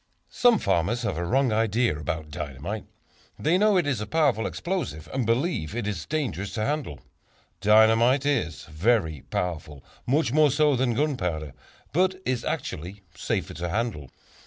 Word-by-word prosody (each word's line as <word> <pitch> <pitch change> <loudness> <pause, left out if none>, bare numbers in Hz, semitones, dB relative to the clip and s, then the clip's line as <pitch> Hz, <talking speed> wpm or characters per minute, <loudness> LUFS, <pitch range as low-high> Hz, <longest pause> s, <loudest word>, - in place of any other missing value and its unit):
Some 245 -2 +4
farmers 100 - 0
have 105 - -1
a - - -1
wrong 130 +7 +2
idea 115 -1 +1
about 75 0 -4
dynamite. 75 +8 -5 0.5
They 170 +5 +2
know 210 -1 +4
it 175 - +2
is 135 -7 -1
a 105 - -4
powerful 140 -6 +2
explosive, 170 - -4
and 130 -4 -1
believe 115 - 0
it 120 -3 -2
is 100 -6 -4
dangerous 110 - -2
to 110 -1 -1
handle. 145 - -3 0.6
Dynamite 110 +6 +5
is 145 -1 0
very 80 - 0
powerful, 80 -5 -3 0.2
much 140 0 +2
more 155 0 +5
so 145 +1 +3
than 125 -2 +1
gunpowder, 90 - -1 0.4
but 185 +3 +2
is 125 -2 -1
actually 100 - -4
safer - - -3
to 85 +3 -4
handle. 105 - -2
115 Hz, 155 wpm, -26 LUFS, 85-145 Hz, 0.6 s, Dynamite